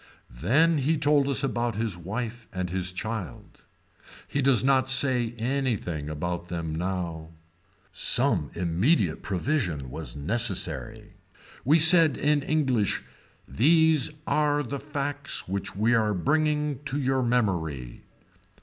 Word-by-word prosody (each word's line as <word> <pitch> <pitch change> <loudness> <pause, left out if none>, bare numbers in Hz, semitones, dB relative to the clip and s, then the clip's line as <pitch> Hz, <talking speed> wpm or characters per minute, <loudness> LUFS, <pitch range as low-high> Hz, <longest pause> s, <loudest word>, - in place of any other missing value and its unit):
Then 150 - +2
he 155 +4 +1
told 145 -1 +2
us 140 -1 0
about 120 -4 -1
his 110 -3 -2
wife 110 +7 -6
and 90 -1 -4
his 90 0 -2
child. 110 +1 -7 0.7
He 140 - -2
does 130 -5 +3
not 130 -1 +2
say 125 -3 +2
anything 115 - -2
about 85 +3 -4
them 85 -3 -4
now. 85 -2 -4 0.6
Some 105 - +2
immediate 90 - +1
provision 90 - -2
was - - -6
necessary. 90 - -1 0.5
We 150 +5 +4
said 160 -2 +7
in 150 0 +1
English 130 -8 0 0.4
these 160 +2 +3 0.2
are 145 -1 +1
the 140 +2 -5
facts 145 0 -4
which 100 +1 -4
we 110 +4 +2
are 110 -3 +1
bringing 150 - 0
to 140 +1 -2
your 135 -1 0
memory. 85 - -1
120 Hz, 120 wpm, -26 LUFS, 90-140 Hz, 0.7 s, said